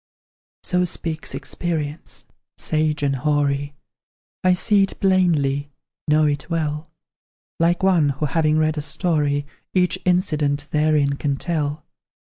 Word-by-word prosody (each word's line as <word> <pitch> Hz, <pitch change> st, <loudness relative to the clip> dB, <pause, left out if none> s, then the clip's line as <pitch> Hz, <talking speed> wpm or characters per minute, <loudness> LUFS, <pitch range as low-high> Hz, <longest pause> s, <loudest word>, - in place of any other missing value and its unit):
So 180 Hz, 0 st, +1 dB
speaks 165 Hz, -2 st, -3 dB
experience, 155 Hz, -3 st, -4 dB, 0.3 s
sage 155 Hz, -1 st, 0 dB
and 140 Hz, -1 st, +1 dB
hoary; 145 Hz, 0 st, 0 dB, 0.7 s
I 185 Hz, 0 st, +5 dB
see 205 Hz, +2 st, +3 dB
it 195 Hz, -, -1 dB
plainly, 155 Hz, -7 st, +2 dB, 0.4 s
know 155 Hz, +1 st, +4 dB
it 145 Hz, +1 st, -1 dB
well, 155 Hz, -2 st, -2 dB, 0.7 s
Like 170 Hz, +2 st, +2 dB
one 175 Hz, -6 st, +4 dB
who, 140 Hz, +2 st, -1 dB
having 155 Hz, +1 st, +2 dB
read 155 Hz, 0 st, +1 dB
a -, -, -2 dB
story, 145 Hz, -2 st, 0 dB, 0.3 s
Each 180 Hz, -1 st, +2 dB
incident 150 Hz, -5 st, +1 dB
therein 150 Hz, -2 st, +2 dB
can 140 Hz, -2 st, -1 dB
tell. 150 Hz, -2 st, -2 dB
155 Hz, 120 wpm, -22 LUFS, 145-170 Hz, 0.7 s, I